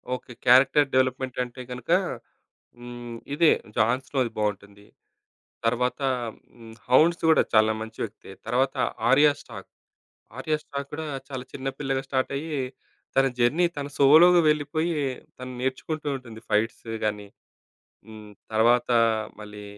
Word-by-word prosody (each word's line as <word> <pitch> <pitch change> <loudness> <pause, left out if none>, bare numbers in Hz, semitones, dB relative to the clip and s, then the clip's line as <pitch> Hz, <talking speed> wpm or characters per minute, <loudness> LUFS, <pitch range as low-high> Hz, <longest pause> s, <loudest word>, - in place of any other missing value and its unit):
Okay. 125 - -11
Character 130 +3 +6
development 130 0 0
అంటే 125 +1 -9
గనక, 125 +5 -6 0.9
హ్మ్. 120 -1 -8 0.2
ఇదే 160 +1 +5 0.3
'జాన్‌ 120 +4 +2
స్టోరీ' 130 -5 -1
బావుంటుంది. 100 -1 -4 0.8
తర్వాత 125 +4 0 0.6
హ్మ్. 115 -1 -12
'హౌండ్స్' 160 +8 +4
కూడా 160 - +5
చాలా 110 0 +5
మంచి 110 0 -8
వ్యక్తే. 105 -2 -9 0.2
తర్వాత 130 +3 +1 0.3
'ఆర్యా 145 +3 +6
స్టార్క్'. - - -11 0.7
'ఆర్యా 155 +3 0
స్టార్క్' 140 0 -6
కూడా 160 - -5 0.2
చాలా 130 -2 -6
చిన్న 135 0 -4
పిల్లగా 135 -2 -1
స్టార్ట్ 130 -1 -1
అయ్యి, 150 +1 -3 0.6
తన 135 0 +5
జర్నీ, 135 +9 +3
తన 140 -1 -3
సోలోగా 165 +6 +7
వెళ్లిపోయి, 155 +3 0 0.4
తను 130 0 -7
నేర్చుకుంటూ 140 +4 -3
ఉంటుంది. 120 -4 -11
ఫైట్స్ 110 +2 0 0.2
గానీ, 105 -1 -2 0.8
హ్మ్. 110 -1 -11 0.2
తర్వాత 120 +3 +3 0.5
మళ్లీ 105 0 -10
130 Hz, 125 wpm, -25 LUFS, 115-145 Hz, 0.9 s, సోలోగా